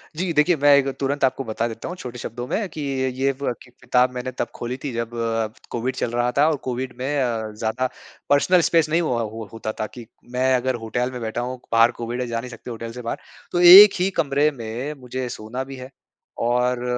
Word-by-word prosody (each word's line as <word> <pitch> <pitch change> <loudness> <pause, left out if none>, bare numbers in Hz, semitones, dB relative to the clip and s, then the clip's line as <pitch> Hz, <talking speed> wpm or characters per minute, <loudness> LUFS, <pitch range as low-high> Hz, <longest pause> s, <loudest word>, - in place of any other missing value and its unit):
जी, 180 +1 -1
देखिए 160 +4 +4
मैं 145 0 +7
एक 140 -1 +2
तुरंत 140 +1 -1
आपको 130 +1 -1
बता 115 0 -2
देता 115 -1 -7
हूँ 180 - -5
छोटे 125 -6 -7
शब्दों 120 +2 -5
में, 205 - -1
कि 155 -2 -7
ये 135 -1 0
ब 130 -3 0
क 125 - -18
किताब 125 0 +3
मैंने 125 +1 -4
तब - - -3
खोली 120 +1 -4
थी 140 - -3
जब 115 0 -3 0.6
कोविड 125 +2 -2
चल 120 - -2
रहा 120 +1 +1
था। 150 - +5
और 155 - +1
कोविड 125 0 -3
में 145 +3 -1
अ, 115 -3 -2
ज़्यादा 110 +4 -2 0.4
पर्सनल 170 +5 +4
स्पेस 165 -2 +3
नहीं 165 +2 +2
हुआ 125 -7 0 0.3
होता 110 -1 -4
था 110 - -1
कि 120 -2 -9 0.3
मैं 130 +1 +2
अगर 130 +1 0
होटल 125 +3 -1
में 125 - -6
बैठा 110 +1 -3
हूँ 125 +1 -4
क - - -46
बाहर 115 +1 +5
कोविड 120 +2 -3
है 125 - -2
जा 115 -1 -2
नहीं 125 +1 -7
सकते 120 0 -9
होटल 115 0 -6
से 125 +1 -8
बाहर। 115 - -3 0.3
तो 175 - 0
1 190 +4 +11
ही 185 +2 +2
कमरे 145 0 +3
में 120 +6 -5
मुझे 125 0 -4
सोना 120 +4 -5
भी 135 0 -9
है। 130 0 -9 0.5
और 125 +1 +1
125 Hz, 225 wpm, -22 LUFS, 120-140 Hz, 0.6 s, 1